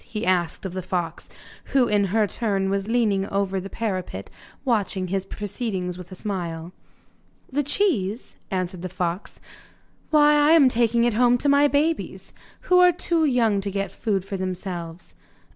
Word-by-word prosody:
he 215 -1 -5
asked 180 0 0
of 185 - -4
the 185 - -3
fox, 175 -2 -4 0.4
who 260 -3 +2
in 205 -2 +2
her 210 +3 +2
turn 195 -2 -1
was 200 0 -1
leaning 215 -4 +1
over 195 -1 -1
the 195 +1 -7
parapet 185 - -4 0.3
watching 200 -6 0
his 195 0 -2
proceedings 200 -4 -4
with 180 0 -11
a - - -7
smile. 175 -4 -5 0.8
'The 290 +3 +1
cheese?' 265 - -1
answered 185 -2 -3
the 185 - -4
fox; 180 +1 -4 0.7
'why 300 -1 +5
I 295 +1 +4
am 290 -6 +7
taking 235 -1 +2
it 240 -1 +2
home 245 +2 +4
to 285 - -2
my 285 +1 +5
babies, 300 +3 -1 0.3
who 360 -1 +4
are 360 0 +7
too 335 -1 0
young 230 -7 +2
to 200 - -3
get 195 -1 -3
food 195 -2 -2
for 195 0 -4
themselves. 180 -2 -6
200 Hz, 165 wpm, -24 LUFS, 185-245 Hz, 0.8 s, am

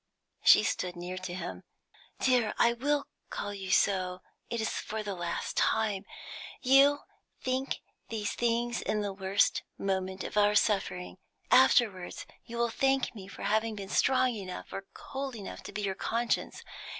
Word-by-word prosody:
She - - +8
stood 180 -1 -1
near 180 +1 -5
to 185 -1 -5
him. 95 - -5 0.6
"Dear, 245 -4 +2
I 235 - +4
will 285 +4 0 0.2
call 205 0 -4
you 195 -1 -6
so, 185 -1 +2 0.3
it 235 - -2
is 220 - 0
for 220 0 -4
the 205 -1 -3
last 175 -2 -3
time, 210 -3 +1 0.5
you 275 +2 +5 0.4
think 260 +1 -1 0.3
these 215 -3 -2
things 235 0 0
in 210 0 0
the 200 -1 -2
worst 195 +1 +2 0.2
moment 190 -1 -2
of - - -5
our 210 0 +5
suffering; 195 -4 +1 0.3
afterwards 220 -8 +4 0.2
you 235 - -7
will 235 -1 +1
thank 270 +1 +1
me 195 -4 -9
for 200 - -9
having 220 +1 +1
been 195 -2 -7
strong 255 +2 +3
enough, 190 -4 -7
or 195 - -6
cold 270 -1 -5
enough, 205 -4 -7
to - - -8
be 210 - -4
your 195 -1 0
conscience. 230 +4 -1
210 Hz, 160 wpm, -30 LUFS, 190-240 Hz, 0.6 s, She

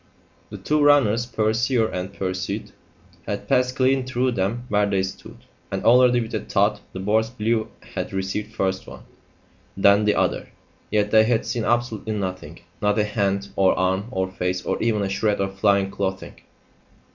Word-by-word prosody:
The - - -7
two 150 0 0
runners, 120 -6 +4
pursuer 115 +1 +1
and 90 0 -5
pursued, 95 -1 -4 0.6
had - - -4
passed 125 0 +2
clean 130 0 +2
through 130 0 0
them 115 +3 -2
where 105 -3 +1
they 95 -1 +1
stood, 95 0 -9 0.2
and - - -3
already 125 +1 +6
with 110 - -6
a - - 0
thud 105 +1 +1
the 95 - -7
boards 110 +3 +1
below 115 -2 -1 0.3
had - - -4
received 95 +3 -4
first 95 0 -1
one, - - -11 0.7
then 100 +2 +5
the 105 - +3
other. - - 0 0.4
Yet 105 -1 +1
they 110 0 +6
had 115 -1 +1
seen 115 -1 -2
absolutely 120 -2 -1
nothing 95 -4 -5 0.2
not 105 0 +1
a 105 - +3
hand, 100 -2 -1
or 95 -1 +3
arm, 95 +3 0
or 95 -6 -2
face, 90 0 -2
or - - -2
even 110 -3 +1
a - - -1
shred 100 +2 0
of 95 0 -3
flying 100 -1 +2
clothing. 95 -1 -3
105 Hz, 170 wpm, -23 LUFS, 95-115 Hz, 0.7 s, already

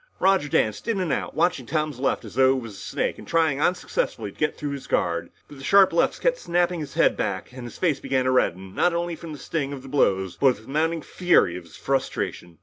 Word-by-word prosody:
Roger 190 -6 +3
danced 110 - 0
in 225 -4 0
and 180 -6 0
out, - - -3
watching 165 -7 +1
Tom's 150 -3 -1
left 135 -2 0
as 105 - -10
though 130 +2 +4
it - - -3
was 115 -3 -8
a - - -11
snake - - -2
and - - -11
trying 160 -4 +2
unsuccessfully 185 - -1
to - - -23
get - - 0
through 145 - -4
his 140 -1 -6
guard. 85 0 0 0.2
But 145 - -13
the - - -10
sharp 195 +3 +5
lefts 170 - +2
kept - - +1
snapping 175 0 0
his 145 -3 -7
head - - +4
back - - -3
and 125 -1 -9
his 120 - -9
face 160 -7 +1
began 130 -2 0
to 130 - +2
redden, 95 -7 0
not 175 -1 +2
only 170 0 -2
from 165 0 -9
the 150 - -7
sting 140 0 -3
of 135 -2 -8
the - - -10
blows 95 -9 +1
but 140 - +4
with 110 - -16
the - - -18
mounting 160 +2 0
fury 175 - +2
of 90 -1 -8
his 85 - -14
frustration. 130 -10 -2
140 Hz, 250 wpm, -24 LUFS, 125-170 Hz, 0.2 s, sharp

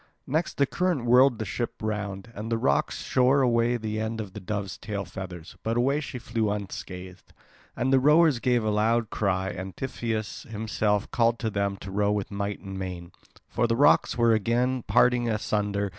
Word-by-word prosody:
Next 160 +5 -1
the 140 - +4
current 175 -4 -1
whirled 125 +1 +5
the 110 - -3
ship 120 +5 -3
round. 105 0 -4
And 110 +2 -6
the 115 - +2
rocks 70 -9 0
shore 130 +2 +3
away 120 0 +2
the 110 -1 -3
end 110 +1 -3
of 100 -4 -6
the - - -6
dove's 100 0 -4
tail 100 -2 -4
feathers; 90 -4 -8
but 115 +1 -1
away 135 +4 +2
she 140 -3 -6
flew 115 -2 -1
unscathed. 95 -3 -6 0.4
And 130 +2 0
the 135 - +6
rowers 150 0 +5
gave 120 -1 +2
a 110 - +1
loud 110 +2 +1
cry; 95 -2 0
and 95 +1 -7
Tiphys 115 -5 -4
himself 105 -2 -1
called 115 0 +2
to 110 -2 -2
them 100 -1 -1
to 100 - -7
row 100 +1 +1
with 105 -1 -2
might 100 0 -3
and 95 -1 -7
main. 90 -2 -6 0.4
For 120 - 0
the 115 - +1
rocks 145 0 +4
were 115 -1 +4
again 120 +4 +1
parting 120 +2 +3
asunder. 105 -2 -1
110 Hz, 190 wpm, -26 LUFS, 100-120 Hz, 0.4 s, the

